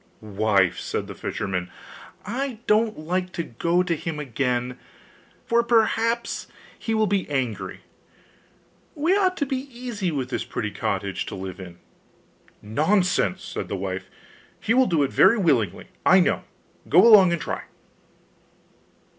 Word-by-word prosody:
'Wife,' 100 -3 +1
said - - -3
the - - -8
fisherman, 90 -3 -3 0.6
'I 250 +4 -3
don't 215 +1 +2
like 180 +4 -2
to 170 - -2
go 170 +8 0
to 175 -2 0
him 160 0 -5
again, 125 -2 -2 0.7
for 235 -1 +3
perhaps 230 0 +1 0.3
he 225 - -2
will 220 0 +3
be 200 -4 -1
angry; 130 -6 -3 1.1
we 325 +5 +2
ought 375 -2 +2
to 285 - 0
be 270 +1 -4
easy 235 -6 -4
with 135 -5 -3
this - - -1
pretty 105 -3 -4
cottage 100 0 -3
to - - -5
live 95 0 -7
in.' 90 -2 -10 0.9
'Nonsense!' 180 - +1
said - - -5
the - - -3
wife; 95 0 -4 0.5
'he 225 - +1
will 255 0 +4
do 165 -5 +2
it 135 - -1
very 200 +5 +5
willingly, 130 - +1 0.2
I - - +6
know; - - +1 0.4
go 175 +8 +7
along 200 -6 +8
and 170 - 0
try! - - -4
170 Hz, 145 wpm, -24 LUFS, -, 1.1 s, along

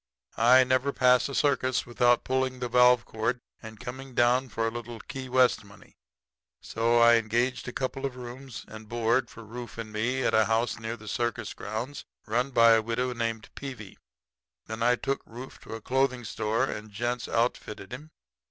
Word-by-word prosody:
I 125 +3 +7
never 130 +2 +1
pass 125 0 +4
a 140 - -5
circus 130 -1 +1
without 120 0 +3
pulling 130 0 0
the 125 0 -3
valve 125 0 +5
cord 115 +3 -2 0.2
and 110 -2 -10
coming 130 +2 -8
down 125 +2 +3
for 115 +1 -1
a - - -2
little 120 0 -7
Key 130 +1 -7
West 125 -2 +3
money; 100 0 -17 0.6
so 115 +1 +1
I 115 0 +7
engaged 120 +4 0
a - - -3
couple 130 +2 -3
of 130 - -9
rooms 125 +1 -9
and 110 0 -11
board 120 +2 +1
for 115 - -11
Rufe 120 +2 -9
and 110 -2 -7
me 125 +5 0
at - - +1
a 110 0 +5
house 115 0 0
near 115 +1 -4
the 110 -1 -13
circus 120 0 -2
grounds 120 +7 -5 0.2
run 125 +5 0
by 115 -3 +6
a 110 0 +5
widow 115 +3 -1
lady 120 -1 -7
named 115 -1 -2
Peevy. 125 -8 -8 0.7
Then 110 +1 -6
I 120 +1 +4
took 135 +3 -2
Rufe 125 +3 -10
to - - -8
a 110 - -8
clothing 130 0 0
store 110 +2 -1
and 110 -5 -4
gent's 120 +4 -3
outfitted 110 -3 -2
him. 150 +5 -8
120 Hz, 190 wpm, -28 LUFS, 115-130 Hz, 0.7 s, I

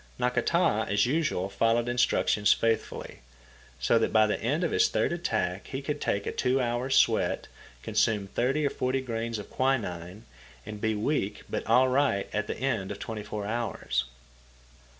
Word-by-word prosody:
Nakata, 125 0 +1
as 100 0 +3
usual, 140 - 0
followed 115 +4 +1
instructions 120 -4 +2
faithfully, 115 -1 -2 0.6
so 115 - +3
that - - 0
by 110 -1 +5
the 105 - -1
end 145 +10 0
of 170 - 0
his - - +3
third - - 0
attack 105 - -2
he 135 - -4
could 145 +1 -4
take 100 0 -1
a - - -2
two 130 +2 +1
hours' 125 +1 0
sweat, - - +2 0.4
consume 105 -3 +1
thirty 130 +9 0
or 140 - +1
forty 130 +1 -1
grains 115 -2 -3
of 105 - -9
quinine, 100 -8 -2 0.4
and 105 -1 -7
be 110 -1 +1
weak 105 -3 -1
but - - -2
all 125 +3 +5
right 130 -6 +1
at 105 0 -1
the - - -4
end 115 -8 -1
of 100 - -5
twenty 110 0 -5
four 105 0 -5
hours. 105 - -2
115 Hz, 170 wpm, -28 LUFS, 105-130 Hz, 0.6 s, by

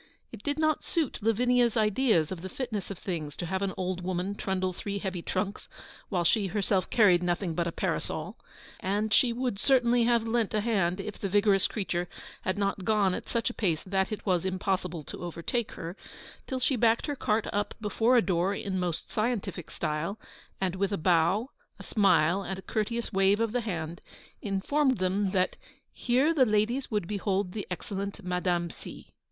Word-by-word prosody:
It 230 - -9
did 290 +4 -1
not 310 -1 +1
suit 320 -6 -1
Lavinia's 240 +2 +3
ideas 215 - +3
of 180 -3 -5
the 190 - -6
fitness 220 -3 -4
of 195 - -5
things 160 -6 -4
to - - -3
have 190 +3 -2
an 195 -1 0
old 185 -1 -2
woman 185 +2 -1
trundle 185 -2 -1
three 200 +3 -4
heavy 190 -3 -3
trunks 195 +3 -3 0.4
while 180 -4 +1
she 195 +4 +3
herself 195 0 0
carried 195 -6 +5
nothing 175 0 0
but 170 +1 0
a - - -1
parasol, - - -2 0.4
and 210 +3 0
she 245 +1 +5
would 240 -4 -2
certainly 245 -2 +4
have 235 -1 +2
lent 225 -2 0
a 210 - +2
hand 195 -5 +1
if 200 +1 -6
the 195 - -2
vigorous 200 0 +4
creature 180 -4 -2 0.3
had 185 +2 -1
not 200 -1 -1
gone 205 -2 +3
at - - -5
such 230 -1 0
a - - -11
pace 170 -7 0
that 190 +2 0
it 215 - -5
was 180 -3 +2
impossible 185 -3 -1
to - - -8
overtake 175 +7 -3
her 170 +1 -6 0.5
till 260 - -2
she 260 +2 +2
backed 230 0 +3
her 290 - -2
cart 220 -4 0
up 205 0 -1
before 225 +3 +3
a 235 - +5
door 185 +2 +1
in 190 -2 -2
most 175 -3 -3
scientific 215 -6 -2
style, 160 +7 -2 0.4
and 190 -2 0
with 200 +1 0
a 200 - 0
bow, 180 - +2 0.3
a - - -10
smile, 180 -3 +3
and 190 -1 -4
a 190 - -9
courteous 230 +1 -2
wave 195 +2 +4
of 230 -1 +1
the 245 +1 0
hand, 170 -6 -4 0.4
informed 260 +7 +1
them 190 +2 +1
that 185 -1 +1 0.4
'here 260 +7 +2
the 285 -5 +5
ladies 225 +4 +1
would 210 -6 -1
behold 200 -1 -1
the 205 +1 -5
excellent 200 +2 -4
Madame 180 -1 0
C.' - - -11
200 Hz, 190 wpm, -29 LUFS, 180-225 Hz, 0.5 s, carried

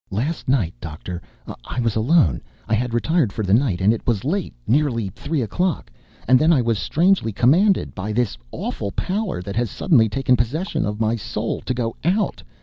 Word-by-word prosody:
"Last 130 - -2
night, 115 -11 +2
Doctor, 85 +3 -6 0.4
I - - -5
was 115 -3 0
alone. 110 - +3 0.3
I - - -1
had 120 +2 0
retired 130 - +1
for 110 - -3
the 95 0 +1
night, 110 -7 +2
and 105 +4 +4
it 115 - -6
was 115 -2 0
late, 185 +5 -1
nearly 120 -6 +1
three 145 - -3
o'clock. 160 - -2 0.4
And 130 +1 +6
then 155 +2 +4
I 155 - +4
was 115 -3 0
strangely 175 -7 +2
commanded, 170 - +3
by 100 +2 -4
this 120 -1 0 0.2
awful 100 - -4
power 190 - -2
that 100 +1 -6
has 120 -1 0
suddenly 115 - +3
taken 130 +3 +2
possession, 130 - -1
of 105 +1 -4
my 110 +1 +1
soul, 105 - -3
to - - -2
go 115 -2 -2
out. 190 +7 0
120 Hz, 190 wpm, -22 LUFS, 105-155 Hz, 0.4 s, And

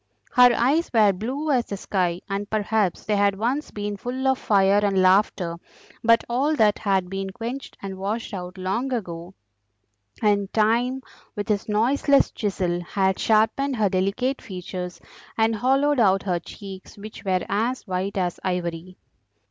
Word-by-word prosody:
Her 250 -1 +7
eyes 285 +8 +2
were 215 -4 +5
blue 260 +11 -3
as 245 -3 +1
the 200 - -4
sky, 180 -3 -1
and 200 +1 -3
perhaps 215 -3 0
they 210 - +1
had 200 -1 +2
once 250 +8 -1
been 205 0 -4
full 255 +5 -3
of 265 0 +2
fire 200 -1 +3
and 195 -2 +2
laughter, 185 -2 +2 0.5
but 230 0 +5
all 275 +6 +1
that 215 -6 +3
had 195 -4 +1
been 195 +1 -4
quenched 235 +7 -6
and 190 -1 -6
washed 215 +4 -3
out 180 0 -6
long 195 +8 -2
ago, 180 -5 -5 0.8
and 205 -3 +1
Time, 240 +4 +1 0.3
with 205 +1 -4
his 210 0 -1
noiseless 265 +6 +3
chisel, 185 -4 -1
had 190 +1 0
sharpened 225 +5 +2
her 215 -4 +2
delicate 200 +9 -1
features 180 -1 -6 0.4
and 225 0 +2
hollowed 270 +4 +2
out 195 -3 +3
her 180 -3 0
cheeks, 195 +3 -11
which 215 +2 -10
were 185 -3 0
as 230 +6 -1
white 190 0 -3
as 180 -2 -1
ivory. 180 -1 -3
205 Hz, 155 wpm, -24 LUFS, 190-235 Hz, 0.8 s, Her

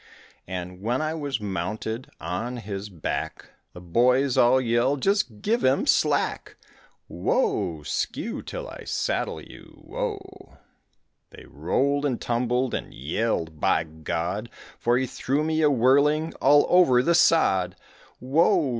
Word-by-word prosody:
And 90 0 -6
when 120 +5 0
I 155 0 -1
was 145 -5 -3
mounted 105 +5 -4
on 120 +7 -4
his 100 -2 -6
back, 85 -5 -5 0.2
The 90 - -11
boys 125 +9 +2
all 120 +2 +5
yelled, 125 +3 +1
"Just 195 - 0
give 230 +3 +1
him - - +2
slack," - - +1 0.5
Whoa! 480 -5 -1
skew, - - -3
till - - -7
I - - -9
saddle - - -2
you, - - -14
whoa! 390 -6 -6 0.7
They - - -14
rolled 140 +1 0
and 135 -5 -1
tumbled 125 +1 -1
and - - -4
yelled, 80 - -2
by 80 - +2
God, 80 +7 -4 0.3
For 120 +1 +2
he 130 - 0
threw 135 +3 -2
me 160 0 0
a 150 - +5
whirling 140 +5 +3
all 145 +2 +5
over 130 -9 +5
the 170 - +3
sod, 95 - +3 0.4
Whoa! 160 - +2
125 Hz, 135 wpm, -25 LUFS, 105-155 Hz, 0.7 s, all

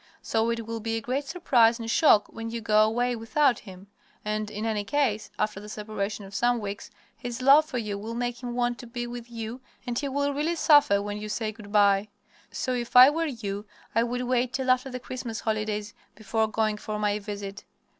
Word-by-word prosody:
So 225 +1 +1
it 230 -1 -2
will 230 0 -4
be 225 +1 -2
a - - -1
great 255 +5 -2
surprise 240 -8 +3
and 230 -2 -6
shock 225 -4 +5
when 225 0 -6
you 230 +1 -4
go 215 -1 +3
away 240 +3 +1
without 240 +3 +2
him. 190 -2 -12 0.4
And 215 0 -2
in 215 +1 -4
any 215 -2 0
case, 225 -2 0
after 210 -2 -1
the 210 +1 -10
separation 210 -1 -4
of 195 - -12
some 240 +4 +2
weeks, 200 -1 -6 0.3
his 240 0 -6
love 280 +4 +6
for 295 -5 -5
you 210 -4 -3
will 225 +3 -6
make 245 0 -3
him 240 -1 -5
want 240 -1 0
to 240 - -9
be 240 +1 -4
with 240 0 -8
you, 230 +2 -6 0.2
and 240 -1 -1
he 280 - -2
will 285 +1 0
really 305 +4 0
suffer 290 -11 +5
when 205 0 -4
you 210 0 -6
say 215 0 -2
good 210 -2 -12
by. 200 -1 +4 0.4
So, 255 - -2
if 240 -1 -4
I 255 +3 +10
were 325 +2 -1
you, 205 -6 -5 0.3
I 230 - +3
would 245 +1 -1
wait 250 0 0
till 260 -1 +1
after 255 +1 +1
the 255 -1 -5
Christmas 245 -3 -6
holidays 215 -1 -2 0.2
before 220 +1 0
going 215 0 0
for 210 0 -5
my 210 0 0
visit. 200 -1 -7
230 Hz, 215 wpm, -27 LUFS, 210-250 Hz, 0.4 s, I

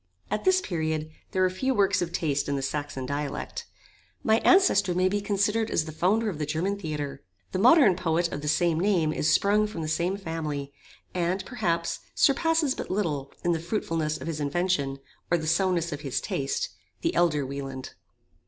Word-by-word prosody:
At 210 - -2
this 375 0 +4
period 160 - -2 0.2
there 185 - +1
were 185 - +4
few 260 +8 -1
works 200 -2 +3
of 170 -1 -2
taste 145 -5 -1
in 140 - 0
the 135 - -2
Saxon 145 -1 -3
dialect. 145 +1 -4 0.6
My 220 +1 +4
ancestor 205 - +4
may 185 +1 +3
be 205 +2 0
considered 205 +2 +1
as 155 - +1
the 160 - -6
founder 195 +8 +1
of 175 -8 -3
the 150 - -1
German 170 +6 0
Theatre. 150 -5 -4 0.3
The - - -1
modern 245 - +6
poet 170 -1 +1
of 145 - -4
the 150 - -5
same 165 +1 +2
name 175 -5 +2
is 155 - +1
sprung 210 +1 +3
from 175 -6 -5
the - - -3
same 170 +5 0
family, 155 -6 -4 0.4
and, 180 +2 -1
perhaps, 170 -9 -1 0.2
surpasses 315 0 +3
but - - -6
little, 155 -9 -1
in 175 - +2
the 165 - +1
fruitfulness 165 -4 -2
of - - -7
his 165 -2 -3
invention, 145 -2 0 0.3
or 175 - +3
the 160 - -4
soundness 170 0 +1
of 145 -1 -5
his 135 -3 -1
taste, 135 0 -2 0.3
the 335 +1 0
elder 150 -5 +2
Wieland. 135 -1 -6
170 Hz, 190 wpm, -27 LUFS, 150-200 Hz, 0.6 s, modern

